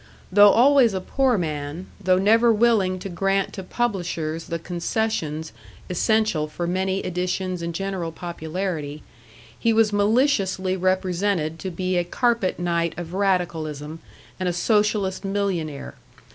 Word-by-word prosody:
Though 205 +2 +8
always 245 -1 +5
a - - 0
poor 255 +5 +1
man, 155 0 -4 0.2
though 185 0 +4
never 225 +5 +4
willing 215 -5 +3
to 185 - -6
grant 195 +1 0
to 190 - -6
publishers 175 -7 -2
the 170 - -3
concessions 170 -2 -2 0.4
essential 215 -4 +1
for 160 +3 -4
many 190 +2 -1
editions 180 0 -2
and 170 0 -3
general 185 -1 -3
popularity, 160 -2 -5 0.6
he 230 - +2
was 220 -1 +3
maliciously 205 -4 +2
represented 185 -3 0
to 190 - -4
be 185 +1 -2
a 175 - +2
carpet 230 +1 0
knight 170 -2 -1
of 175 0 -6
radicalism 165 -6 -1 0.4
and 185 -1 0
a - - -1
socialist 205 0 +1
millionaire. 195 -7 -2
185 Hz, 130 wpm, -23 LUFS, 170-205 Hz, 0.6 s, Though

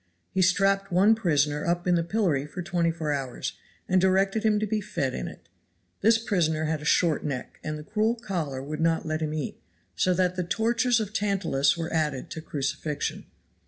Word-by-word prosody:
He 190 - +1
strapped 195 +1 +3
one 195 +5 +5
prisoner 150 -8 +1
up 175 0 0
in 180 - +3
the 170 - +3
pillory 165 -7 0
for 175 +4 -6
twenty 170 -2 +1
four 160 -2 -2
hours, 135 -3 -3 0.3
and 185 0 +3
directed 195 +3 +2
him 215 -1 +3
to 215 - 0
be 215 +1 -1
fed 140 -9 -2
in - - -4
it. - - -11 0.5
This 225 +2 +5
prisoner 165 -8 0
had 155 -1 -1
a - - -8
short 165 0 +3
neck, 135 -4 -5
and 155 0 -3
the 150 - -8
cruel 215 +7 +1
collar 170 - -4
would 150 +3 -5
not 165 -1 +2
let 155 0 -2
him 155 0 -2
eat, 150 - -4 0.3
so 185 -1 +2
that 180 0 +1
the 180 - -1
tortures 230 +6 +2
of 215 -1 -4
Tantalus 190 -9 +1
were 165 0 -4
added 150 -5 -1
to 160 - -5
crucifixion. 150 0 -3
175 Hz, 195 wpm, -27 LUFS, 155-195 Hz, 0.5 s, one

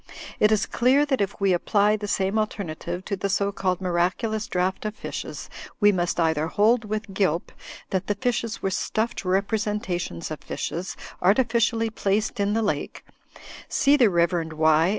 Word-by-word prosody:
It 210 - +5
is 215 -1 +3
clear 265 +4 +3
that 265 -6 0
if 200 +1 -2
we 195 -2 +3
apply 205 +4 +2
the 210 -1 -5
same 195 +2 0
alternative 180 -4 -4
to 200 - -2
the 195 +1 -2
so 200 0 +1
called 185 -2 -1
Miraculous 185 +5 0
Draught 185 +1 -1
of 215 0 -3
Fishes - - -6 0.3
we 205 -1 +6
must 175 -2 -1
either 160 -2 +2
hold 220 +6 +3
with 215 -1 -4
Gilp, 185 -4 0 0.4
that 190 0 -1
the 205 - 0
fishes 230 0 -2
were 195 - 0
stuffed 220 +4 -1
representations 200 -3 -1
of 155 - -4
fishes 175 +3 -4 0.2
artificially 225 +2 +2
placed 210 0 -1
in 200 +1 +1
the 225 +1 +1
lake 205 - -3 0.6
(sefe 285 +1 +3
the 235 -4 +6
Rev. 170 -2 +1
Y. 160 +2 +4
200 Hz, 165 wpm, -25 LUFS, 180-220 Hz, 0.6 s, we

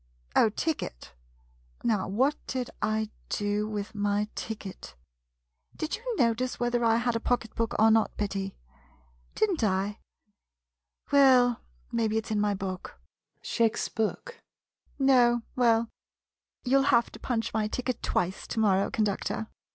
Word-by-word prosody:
Oh, 220 - +6
ticket 210 - -4 0.3
— - - -33
now 210 -5 +1
what 260 +10 +2
did 255 -2 -3
I 215 0 0 0.2
do 205 +1 -1
with 210 +1 -4
my 205 0 0
ticket? 210 - -7 0.8
Did 315 - -2
you 475 +1 -4
notice 245 +1 +1
whether 240 0 +1
I 225 -1 +4
had 240 0 0
a - - +1
pocket 230 -2 -1
book 230 -1 -1
or 220 +1 +6
not, 220 0 +2
Betty? 195 -1 -3 0.8
Did 435 -2 +2
n't 320 -10 -2
I? 200 +1 0 1.1
Well, 255 -4 +5 0.3
maybe 220 -2 +1
it 220 - -1
's - - -7
in 210 -1 +1
my 205 -1 +1
book. 190 -1 -6 0.4
[Shakes 230 -1 +1
book.] 460 - -3 0.6
No 245 -4 +4
— - - -35
well 235 -2 +3 0.4
— - - -65
you 260 +2 +4
'11 275 +1 +2
have 235 0 +3
to - - -11
punch 230 -3 -2
my 215 -1 +1
ticket 255 +3 -3
twice 180 +2 -1
to - - -3
morrow, 195 -3 +3
conductor. 215 0 -1
225 Hz, 150 wpm, -28 LUFS, 205-245 Hz, 1.1 s, Oh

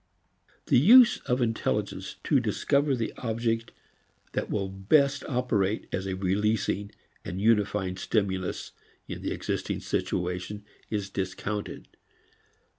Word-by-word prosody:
The - - +5
use 235 - +8
of 125 0 +2
intelligence 115 -1 -2
to - - +3
discover 140 0 +1
the 115 -3 -3
object 115 -1 -1 0.6
that - - -2
will 100 -2 -1
best 135 +10 +2
operate 110 -6 0
as 95 +1 -2
a 95 - -2
releasing 100 +2 0 0.3
and 90 - -5
unifying 105 -3 +2
stimulus 95 -2 -1 0.4
in - - -6
the - - -2
existing - - -3
situation 90 +3 -2 0.2
is 100 -3 -3
discounted. 100 +2 -4
105 Hz, 115 wpm, -28 LUFS, 95-120 Hz, 0.6 s, use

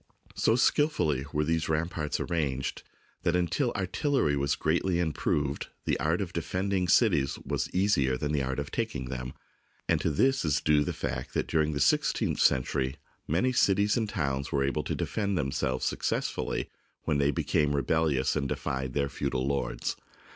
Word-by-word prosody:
So 110 - +2
skilfully 90 - +2
were 75 - +1
these 80 +1 0
ram 80 +1 +1
parts 75 -4 -3
arranged 70 -6 -2 0.4
that 85 - +1
until 90 - +1
artillery 95 - +1
was 70 0 +1
greatly 85 +3 +1
improved 75 -4 -1 0.2
the - - 0
art 80 +6 +1
of 85 -3 -4
defending 90 +3 -1
cities 70 -4 +3
was - - -1
easier 70 -10 +2
than 75 +2 -2
the 75 -2 +1
art 65 0 -2
of 70 0 -4
taking 75 - -3
them, 65 0 -5 0.5
and - - +2
to - - +1
this 130 - +2
is 75 -3 +2
due 75 -1 +3
the - - -2
fact 65 0 -4
that - - +1
during 80 -1 +1
the 70 - -2
sixteenth - - +2
century 65 +1 +2 0.3
many 105 - +2
cities 100 -3 +3
and 110 -4 0
towns 70 -8 -2
were 70 -1 +1
able 70 +2 0
to - - -2
defend 100 -3 -1
themselves 70 -3 -1
suc - - -1
cessfully - - -1 0.4
when 75 -2 +1
they 70 0 +3
became 75 0 +1
rebellious 75 -2 +1
and 70 -3 -1
defied 65 -1 -3
their 70 -1 +1
feudal 70 -1 -2
lords. 70 -3 -2
75 Hz, 170 wpm, -29 LUFS, 70-90 Hz, 0.5 s, cities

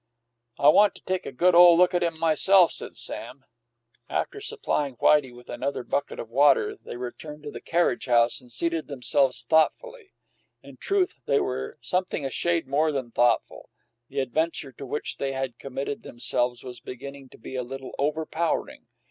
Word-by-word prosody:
"I 145 - +6
want 205 +6 +5
to - - -15
take 185 0 -2
a - - -5
good 175 +8 +3
ole 175 0 +8
look 180 +1 +4
at 175 - +1
him 170 -2 -1
myself," 165 +3 +4
said - - -7
Sam. - - -6 0.6
After 420 - -2
supplying 405 - -2
Whitey 140 +1 +3
with 120 0 -15
another 140 -2 -3
bucket 140 +3 -2
of 115 - -6
water, 145 - +4
they 265 - -9
returned 150 +5 -8
to 145 - -6
the - - -8
carriage 170 -7 0
house 120 +1 +3
and 125 -1 -17
seated 165 +6 -2
themselves 130 -2 +1
thoughtfully. 390 - 0 0.5
In - - -13
truth, 390 -2 0
they 140 - +3
were 130 +3 -3
something 180 -5 -2
a 135 - -3
shade 170 -2 0
more 150 +3 +2
than 130 -5 -4
thoughtful; 120 -1 +1 0.4
the 135 0 -1
adventure 150 +2 -2
to 135 +2 -10
which 150 - -4
they 135 -1 -2
had 135 -3 -4
committed 135 +1 -5
themselves 120 0 -2
was 125 -1 -8
beginning 135 +1 -9
to - - -16
be 125 - -9
a 130 - -1
little 135 +2 -8
overpowering. 155 +3 -2
140 Hz, 175 wpm, -26 LUFS, 130-170 Hz, 0.6 s, ole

